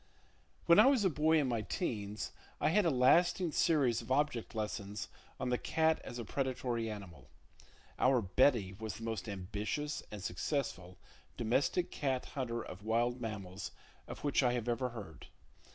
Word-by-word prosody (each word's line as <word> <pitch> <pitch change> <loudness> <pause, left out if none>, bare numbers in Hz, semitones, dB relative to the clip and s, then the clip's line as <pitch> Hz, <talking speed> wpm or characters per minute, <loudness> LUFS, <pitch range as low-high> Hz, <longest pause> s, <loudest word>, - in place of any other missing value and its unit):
When 170 0 +7
I - - +8
was 265 -7 +4
a 185 - +4
boy 160 +2 +3
in 145 -3 +2
my 120 -3 0
'teens, 105 - -3 0.3
I - - +3
had 200 +4 +3
a - - +4
lasting 165 +6 +4
series 140 -8 +2
of - - -9
object 130 -5 0
lessons 105 -2 -4 0.3
on 130 - -1
the 125 - +1
cat 160 0 +2
as 120 - -7
a 120 - -5
predatory 125 -3 -2
animal. 90 - -9 0.7
Our 130 -1 +4
"Betty" 105 -1 +3
was 110 +1 -6
the 115 - -9
most 110 -2 -3
ambitious 105 +10 -3
and 105 -2 -7
successful 90 - -3 0.4
domestic 135 +10 +1
cat 135 -3 -1
hunter 120 -4 -2
of 95 +3 -9
wild 120 +3 +1
mammals 100 -5 -5 0.4
of - - -8
which 145 -1 +2
I 125 -2 +2
ever 120 0 -1 0.2
have - - -13
heard. 95 -9 -9
120 Hz, 165 wpm, -34 LUFS, 105-145 Hz, 0.7 s, I